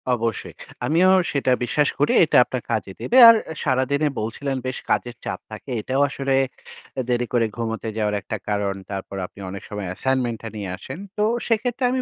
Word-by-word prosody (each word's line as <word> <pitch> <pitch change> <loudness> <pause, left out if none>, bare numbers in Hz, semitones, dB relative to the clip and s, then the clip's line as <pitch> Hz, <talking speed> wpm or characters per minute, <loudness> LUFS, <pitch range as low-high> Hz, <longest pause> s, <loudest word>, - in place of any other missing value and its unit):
অবশ্যই 115 -1 -3 0.3
আমিও 175 +5 +4 0.2
সেটা 140 -2 +1
বিশ্বাস 145 +4 +2
করি 145 - +3
এটা 155 - +3
আপনার 130 -2 -4
কাজে 105 -3 -1
দেবে। 250 - +1
আর 230 - +9 0.3
সারাদিনে 140 +2 +1
বলছিলেন 125 +6 -3
বেশ 130 - -3
কাজের 120 0 0
চাপ - - -3
থাকে, - - -9
এটাও 130 +5 0
আসলে 135 -1 -1 0.7
এ - - +2
দেরি 125 0 +1
করে 115 -2 +3
ঘুমোতে 115 -1 -3
যাওয়ার 105 -1 0
একটা 110 - -4
কারণ। 100 -1 0 0.2
তারপর 95 0 -5
আপনি 90 - -14
অনেক 100 +1 -7
সময় 105 -3 -4
অ্যাসাইনমেন্টটা 120 +2 -1
নিয়ে 100 -3 -4
আসেন। 135 - -8 0.2
তো 210 - +2 0.2
সেক্ষেত্রে 240 +3 0
আমি 260 0 0
125 Hz, 175 wpm, -23 LUFS, 110-140 Hz, 0.7 s, আর